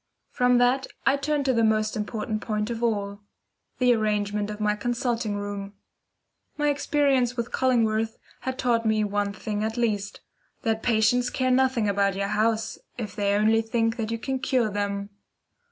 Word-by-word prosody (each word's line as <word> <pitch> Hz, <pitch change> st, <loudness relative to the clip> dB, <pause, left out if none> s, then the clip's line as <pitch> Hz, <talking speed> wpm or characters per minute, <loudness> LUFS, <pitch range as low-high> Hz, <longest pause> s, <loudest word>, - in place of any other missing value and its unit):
From 250 Hz, 0 st, +3 dB
that 250 Hz, +2 st, +3 dB, 0.2 s
I 270 Hz, -, +5 dB
turned 285 Hz, 0 st, -1 dB
to 260 Hz, -, +3 dB
the 230 Hz, -1 st, +2 dB
most 215 Hz, -1 st, +2 dB
important 215 Hz, 0 st, -3 dB
point 210 Hz, 0 st, -2 dB
of 230 Hz, 0 st, -4 dB
all 205 Hz, -3 st, -1 dB, 0.6 s
the 250 Hz, -1 st, +4 dB
arrangement 210 Hz, -2 st, 0 dB
of 210 Hz, 0 st, -6 dB
my 210 Hz, 0 st, +1 dB
consulting 235 Hz, -1 st, -1 dB
room. 205 Hz, 0 st, -5 dB, 0.8 s
My 295 Hz, -1 st, +2 dB
experience 275 Hz, -4 st, +1 dB
with 235 Hz, -1 st, -3 dB
Cullingworth 225 Hz, -3 st, +1 dB, 0.2 s
had 260 Hz, 0 st, -4 dB
taught 235 Hz, -3 st, +1 dB
me 220 Hz, -1 st, +2 dB
one 205 Hz, 0 st, -1 dB
thing 210 Hz, +1 st, -4 dB
at 220 Hz, +2 st, -2 dB
least, 210 Hz, -4 st, -1 dB, 0.4 s
that 225 Hz, -2 st, 0 dB
patients 240 Hz, +2 st, +2 dB
care 255 Hz, 0 st, 0 dB
nothing 255 Hz, -4 st, +2 dB
about 200 Hz, -1 st, +1 dB
your 200 Hz, 0 st, -1 dB
house 220 Hz, +1 st, 0 dB, 0.2 s
if 210 Hz, -6 st, -5 dB
they 200 Hz, -1 st, +1 dB
only 220 Hz, +2 st, +3 dB
think 225 Hz, +1 st, 0 dB
that 220 Hz, -2 st, -2 dB
you 230 Hz, -, -1 dB
can 265 Hz, +3 st, -3 dB
cure 250 Hz, -4 st, +1 dB
them. 200 Hz, 0 st, -2 dB
225 Hz, 170 wpm, -26 LUFS, 210-245 Hz, 0.8 s, I